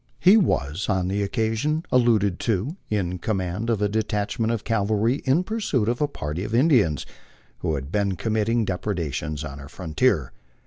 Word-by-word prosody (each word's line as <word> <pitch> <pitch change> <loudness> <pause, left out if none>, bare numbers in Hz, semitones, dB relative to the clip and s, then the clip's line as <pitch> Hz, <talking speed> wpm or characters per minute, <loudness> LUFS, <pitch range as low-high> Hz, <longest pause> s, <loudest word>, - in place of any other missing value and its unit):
He 190 +4 +7
was, 85 - +1
on 95 -1 +1
the 100 +1 0
occasion 115 - 0
alluded 110 -7 +3
to, 115 - -1
in 90 -4 -1
com 110 +3 -1
mand 95 +5 -3
of 110 -3 +1
a - - +3
detachment 110 +1 -1
of 115 -3 -2
cavalry 110 +3 +1
in 140 +7 +3
pursuit 185 - -1
of 120 +3 0
a 150 - +3
party 80 - -4
of 110 +2 -2
Indians 120 - +3 0.5
who 80 - -1
had 70 +1 -5
been 100 -3 0
Rommitting 110 +2 +1
depredations 80 -6 -3
on 70 -1 -7
our 70 0 -10
frontier. 80 - 0
105 Hz, 170 wpm, -24 LUFS, 90-120 Hz, 0.5 s, He